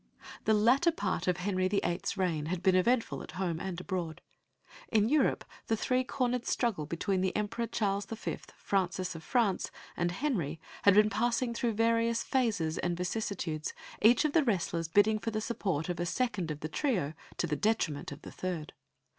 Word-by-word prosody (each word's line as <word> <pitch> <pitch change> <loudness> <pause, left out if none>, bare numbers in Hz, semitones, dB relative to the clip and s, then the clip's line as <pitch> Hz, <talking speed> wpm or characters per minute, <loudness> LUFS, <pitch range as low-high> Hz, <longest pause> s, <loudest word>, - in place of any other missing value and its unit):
The 220 - +4
latter 250 +11 +4
part 185 - -2
of 180 -1 +2
Henry 185 0 0
VIII.'s 185 -1 -1
reign 165 -5 0
had 180 +1 -3
been 190 -1 +5
eventful 230 +6 +2
at - - -9
home 175 -3 -2
and 185 -2 -4
abroad. 180 -4 -3 0.7
In 215 -1 +3
Europe 295 -1 +2 0.2
the 225 - +1
three 255 +3 +1
cornered 250 -2 -1
struggle 200 - 0
between 185 +4 -1
the 190 0 0
Emperor 225 +3 -1
Charles 205 -3 -1
V., 225 0 -4 0.2
Francis 185 -1 -1
of 165 - -8
France, 220 0 +1 0.3
and 175 0 0
Henry 175 - -1 0.2
had 200 -1 +6
been 210 +1 +6
passing 235 +3 +1
through 230 0 0
various 230 +1 +2
phases 215 - 0
and 175 -1 -1
vicissitudes, 180 -4 -3 0.3
each 240 +7 +6
of 300 - +1
the 330 - +5
wrestlers 175 -7 0
bidding 205 +5 +4
for 225 - -2
the 215 -1 -2
support 190 -9 -2
of 175 -1 -3
a 175 - -1
second 210 -6 -1
of 150 -1 -5
the 155 - -2
trio, 180 - 0 0.2
to - - +1
the 150 - -1
detriment 160 -7 0
of 145 - -9
the - - -8
third. 175 -5 -4
200 Hz, 180 wpm, -31 LUFS, 175-230 Hz, 0.7 s, had